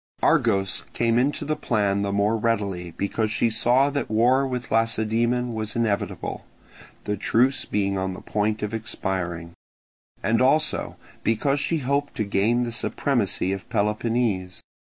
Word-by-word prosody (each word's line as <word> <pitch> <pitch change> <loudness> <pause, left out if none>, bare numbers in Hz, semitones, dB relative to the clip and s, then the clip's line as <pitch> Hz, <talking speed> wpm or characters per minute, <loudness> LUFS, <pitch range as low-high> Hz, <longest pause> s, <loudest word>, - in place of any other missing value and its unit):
Argos 95 -5 +2
came 115 0 +2
into 140 +4 0
the 155 - 0
plan 100 -8 0
the 100 0 -1
more 100 +2 +2
readily 100 -6 -1
because 110 +2 -1
she 115 +1 +1
saw 125 +5 +3
that 140 0 -2
war 125 +5 +3
with 125 -2 -5
Lacedaemon 115 +2 +1
was 110 -1 -4
inevitable, 105 -3 -2 0.6
the 105 - -1
truce 125 +6 +2
being 100 -2 -1
on 95 0 -2
the - - -10
point 105 0 -1
of 105 +1 -3
expiring; 95 -6 -3 0.7
and 115 +2 +2
also 150 +4 +2 0.3
because 135 +6 +1
she 165 +4 +1
hoped 140 +1 -1
to 115 - 0
gain 105 +4 +1
the 120 - -3
supremacy 115 -5 0
of 95 - -7
Peloponnese. 105 -3 -1
110 Hz, 145 wpm, -24 LUFS, 100-125 Hz, 0.7 s, saw